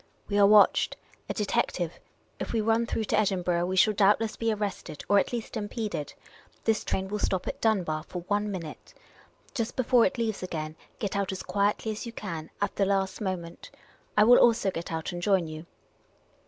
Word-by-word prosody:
" - - -38
We 205 0 +1
are 200 - +7
watched. 210 0 +5 0.3
A - - -1
detective! 175 -5 -1 0.4
If - - -4
we 230 - +2
run 225 +2 +2
through 225 - -1
to - - +1
Edinburgh, 180 -4 +1
we 185 - -2
shall 210 +3 +5
doubtless 210 +2 +3
be 230 -1 0
arrested 205 -7 -4
or 205 - +5
at - - -1
least 235 -1 -4
impeded. 210 -7 -4 0.5
This 220 -1 +1
train 190 0 -2
will 210 +2 -3
stop 190 -2 -1
at - - -4
Dunbar 180 -9 +1
for 180 -1 -6
one 205 +3 0
minute. 170 -6 -7 0.6
Just 230 -3 -2
before 250 -1 +4
it 275 - +1
leaves 225 -3 -1
again, 155 -4 -4 0.2
get 205 -2 -3
out 200 -1 0
as 190 - -5
quietly 205 +2 0
as 215 +2 -5
you - - -5
can 165 -8 -6
— - - -30
at - - -3
the 200 - +3
last 195 0 0
mo 190 -2 0
ment. 170 0 -11 0.5
I 210 - +7
will 245 +3 +7
also 225 -4 +4
get 170 -1 -6
out 160 -1 -3
and 175 0 -5
join 190 -2 +2
you. 155 +1 -8
200 Hz, 205 wpm, -28 LUFS, 180-220 Hz, 0.6 s, are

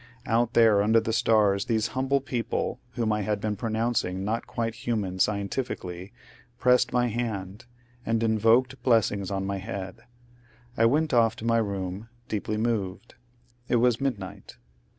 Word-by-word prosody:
Out 120 +1 +1
there 110 -3 +6
under 110 +2 +4
the 110 0 -2
stars 105 -3 +3
these 110 -2 0
humble 135 +2 0
people, 125 -1 -2
whom 115 -3 0
I 105 - -1
had 105 0 -1
been 105 0 -2
pronouncing 110 -4 -1
not 115 +3 -2
quite 115 -1 -2
human 105 -6 -3
scientifically, 100 -3 -2 0.5
pressed 125 0 +3
my 125 0 +2
hand, 110 -4 -4 0.4
and 115 -1 0
invoked 115 +4 +2
blessings 105 -5 +2
on 95 -1 -2
my 100 0 -2
head. 95 +2 -7 0.7
I 115 -2 +4
went 150 +5 +1
off 115 -2 +4
to 115 - -8
my 115 0 +3
room, 100 0 -4 0.2
deeply 105 0 -2
moved. 110 -2 -2 0.6
It - - +2
was 120 +1 +3
midnight. 100 -7 -4
110 Hz, 150 wpm, -26 LUFS, 100-120 Hz, 0.7 s, there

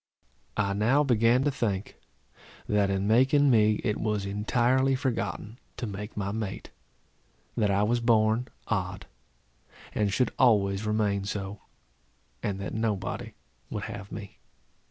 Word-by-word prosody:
I 100 -2 +1
now 120 +9 +3
began 120 -1 +3
to 145 - +2
think, 105 -7 -2 0.7
that 105 -1 +2
in 95 0 0
making 130 +5 +4
me, 105 -2 +4
it 105 - 0
was 105 -2 -1
entirely 120 +6 +2
forgotten 125 -3 -3 0.2
to 125 - -3
make 105 +1 -6
my 100 -1 -1
mate; 105 -2 -5 0.8
that 105 - +2
I 100 +1 +2
was 120 +3 +2
born 115 +1 +3 0.2
odd, - - -2 0.9
and 105 -2 +1
should 125 +4 +1
always 105 -4 +3
remain 105 -2 +1
so, 100 0 -4 0.8
and 100 -2 -2
that 100 - -5
nobody 105 -4 -2 0.4
would 105 - -4
have 105 -2 -7
me. 100 -3 -8
105 Hz, 135 wpm, -28 LUFS, 100-120 Hz, 0.9 s, making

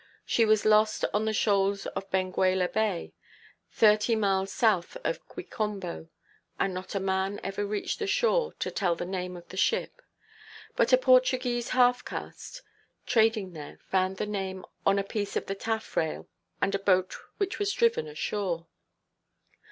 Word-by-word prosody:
She 230 - +3
was 215 -1 +3
lost 215 0 +4
on 210 +1 +1
the 220 - +1
shoals 200 -2 +1
of 195 - -5
Benguela 185 0 +1
Bay, 210 -5 -1 0.6
thirty 215 +1 +4
miles 195 -2 +1
south 215 - +1
of - - -3
Quicombo; 195 -7 -5 0.5
and 195 - +1
not 185 +2 -6
a - - +1
man 190 +1 -1
ever 200 +1 -3
reached 210 - -3
the 420 - -2
shore 475 +3 +2
to - - -3
tell 180 -4 0
the 175 - -4
name 180 -1 -4
of 175 - -13
the 190 - -9
ship. 480 - 0 0.7
But - - +2
a - - +8
Portuguese 255 - +3
half–caste, 250 - 0 0.4
trading 220 -5 +2
there, 150 -3 -9
found 190 0 +1
the - - -1
name 190 -2 -4 0.2
on 195 0 +4
a 200 - +1
piece 205 0 -4
of - - -1
the 195 - -3
taffrail, 220 -6 -2 0.3
and 195 - +1
a 195 - +1
boat 185 -2 +2 0.2
which 400 0 -2
was 405 -1 +1
driven 465 +2 +2
ashore. 195 - -3
205 Hz, 155 wpm, -28 LUFS, 190-230 Hz, 0.7 s, a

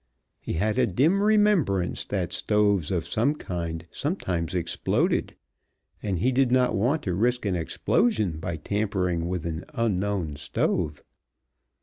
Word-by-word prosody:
He - - -5
had 105 +8 0
a 125 - +4
dim 150 - +2
remembrance 205 - +2
that 95 -4 -2
stoves 100 -6 +2
of 90 -4 -1
some 130 +7 +1
kind 85 - -4
sometimes 95 - -2
exploded, 85 -2 0 0.7
and 100 -3 -1
he 125 +10 +2
did 130 -1 +2
not 125 -2 +3
want 125 +10 +1
to 90 - -1
risk 120 +5 +1
an 95 -2 0
explosion 95 +1 0
by 85 0 -3
tampering 90 -2 -1
with 90 -2 -3
an 80 0 -3
unknown 100 -8 -1
stove. 75 +1 -1
100 Hz, 135 wpm, -26 LUFS, 85-120 Hz, 0.7 s, a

